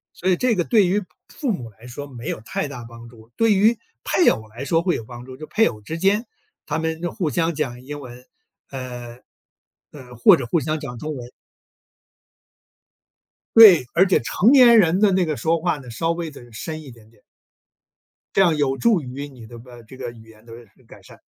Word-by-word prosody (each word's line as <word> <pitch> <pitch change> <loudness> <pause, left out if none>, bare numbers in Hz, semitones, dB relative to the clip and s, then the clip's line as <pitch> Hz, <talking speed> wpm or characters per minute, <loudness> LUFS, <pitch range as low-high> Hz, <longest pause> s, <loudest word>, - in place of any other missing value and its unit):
所 185 - -2
以 185 - +4
这 240 +4 +1
个 175 - 0
对 210 +1 +3
于 200 +3 0 0.2
父 270 -5 -3
母 125 - -5
来 110 +4 -16
说 140 +4 -8
没 125 -4 -8
有 - - -4
太 110 - -4
大 125 -4 -8
帮 115 0 -12
助， 115 -1 -17
对 225 -2 +4
于 215 +4 +3 0.3
配 360 - +2
偶 110 0 -2
来 120 +5 -8
说 165 +2 +1
会 175 0 0
有 - - -5
帮 120 +2 -11
助， 130 0 -11
就 155 - -8
配 225 - +2
偶 105 -2 -6
之 160 +10 -6
间 200 +6 +1 0.4
他 - - -2
们 160 0 -3
就 175 -1 -3
互 170 -5 -2
相 165 +2 0
讲 130 -5 -4
英 145 +2 -7
文， 125 -2 -12 0.4
呃， 125 -2 -8 0.7
呃， 125 -4 -12
或 120 - +6
者 130 - -5
互 165 +8 +1
相 155 +1 -2
讲 130 -5 -7
中 150 +5 -5
文。 120 -2 -8 2.3
对， 200 - +9
而 180 +3 +5
且 185 - +3
成 190 - +2
年 250 -4 +7
人 180 -2 +3
的 210 -1 +4
那 185 -1 +2
个 155 -2 -2
说 160 +7 0
话 170 -1 -1
呢， 130 -4 -12
稍 165 +9 -1
微 170 -1 -4
地 125 -5 -14
深 155 +7 -6
一 140 -4 -12
点 115 -2 -18
点。 110 -2 -27 1.1
这 - - +4
样 170 -4 +4
有 135 -2 0
助 220 -3 +2
于 135 +2 -7
你 125 -5 -13
的 120 - -11
吧 120 0 -13
这 130 - -13
个 125 -2 -6
语 115 -1 -15
言 110 0 -19
的 115 - -12 0.3
改 - - -15
善。 - - -17
145 Hz, 230 characters per minute, -22 LUFS, 120-175 Hz, 2.3 s, 对